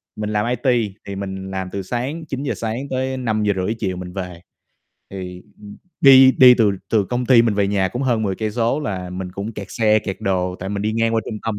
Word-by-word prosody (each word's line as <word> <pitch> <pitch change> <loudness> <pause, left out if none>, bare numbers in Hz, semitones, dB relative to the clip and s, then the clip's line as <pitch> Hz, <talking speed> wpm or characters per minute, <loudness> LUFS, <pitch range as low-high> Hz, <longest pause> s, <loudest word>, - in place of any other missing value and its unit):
mình 105 0 -4
làm 105 0 0
IT 120 -4 0
thì 100 - -6
mình 95 -1 -6
làm 95 -1 -4
từ 100 - -4
sáng 130 - -4
9:00 140 -1 -3
sáng 115 +5 -4
tới 130 0 -2
5:30 105 -4 -1
chiều 95 -4 -2
mình 90 0 -8
về. 90 -3 -6 0.7
Thì, 90 -2 -7 0.2
ừm, 105 -1 -11 0.2
đi 135 -1 +8
đi 125 -1 +9
từ 110 -4 +3 0.2
từ 110 -3 +3
công 125 +4 -3
ty 120 -2 +6
mình 115 -3 +1
về 100 -1 +1
nhà 95 -2 +1
cũng 125 +3 -4
hơn 120 -4 +1
10 95 -3 -1
cây 110 -1 -2
số 120 +5 0
là 95 -10 -4
mình 90 0 -6
cũng 100 +4 -5
kẹt 100 -2 -7
xe, 110 -2 +3
kẹt 100 -3 -5
đồ 90 -1 -1
tại 95 - -4
mình 100 0 -3
đi 110 +1 -1
ngang 115 0 +1
qua 115 - +2
trung 110 -2 -5
tâm, 110 -2 -2
105 Hz, 235 wpm, -20 LUFS, 95-120 Hz, 0.7 s, đi